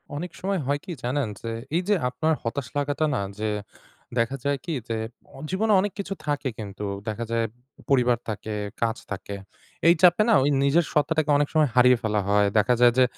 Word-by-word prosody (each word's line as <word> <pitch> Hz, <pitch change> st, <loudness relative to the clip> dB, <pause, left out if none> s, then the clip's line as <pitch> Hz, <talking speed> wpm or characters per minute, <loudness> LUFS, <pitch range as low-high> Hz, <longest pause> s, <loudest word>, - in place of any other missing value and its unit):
অনেক 170 Hz, +4 st, -4 dB
সময় 195 Hz, 0 st, 0 dB
হয় 145 Hz, +2 st, 0 dB
কি 185 Hz, -, -6 dB
জানেন? 130 Hz, +1 st, 0 dB
যে 115 Hz, -, -4 dB, 0.2 s
এই 175 Hz, -, +3 dB
যে 210 Hz, -, +4 dB
আপনার 155 Hz, +6 st, 0 dB
হতাশ 120 Hz, +2 st, -3 dB
লাগাটা 145 Hz, +2 st, 0 dB
না 100 Hz, -, 0 dB, 0.2 s
যে 110 Hz, 0 st, 0 dB, 0.7 s
দেখা 115 Hz, +4 st, +1 dB
যায় 140 Hz, 0 st, +1 dB
কি 170 Hz, -, -2 dB, 0.2 s
যে 115 Hz, -, -1 dB, 0.5 s
জীবনে 210 Hz, +4 st, +2 dB
অনেক 205 Hz, +2 st, 0 dB
কিছু 195 Hz, -, -3 dB
থাকে 145 Hz, -2 st, 0 dB
কিন্তু 100 Hz, -1 st, -6 dB, 0.2 s
দেখা 110 Hz, +2 st, -3 dB
যায় 115 Hz, 0 st, +1 dB, 0.4 s
পরিবার 125 Hz, -3 st, +4 dB
থাকে, 110 Hz, 0 st, -4 dB, 0.3 s
কাজ 115 Hz, 0 st, +1 dB
থাকে। 100 Hz, 0 st, -5 dB, 0.5 s
এই 170 Hz, -, +8 dB
চাপে 180 Hz, +2 st, +6 dB
না -, -, +6 dB
ওই 145 Hz, -, +3 dB
নিজের 150 Hz, +4 st, +3 dB
সত্ত্বাটাকে 155 Hz, 0 st, +1 dB
অনেক 145 Hz, 0 st, +2 dB
সময় 155 Hz, -3 st, +4 dB
হারিয়ে 125 Hz, 0 st, +6 dB
ফেলা 105 Hz, -3 st, 0 dB
হয়। 100 Hz, 0 st, +4 dB
দেখা 105 Hz, +4 st, +4 dB
যায় 120 Hz, -1 st, +7 dB
যে 130 Hz, -, +7 dB
135 Hz, 190 wpm, -25 LUFS, 115-160 Hz, 0.7 s, এই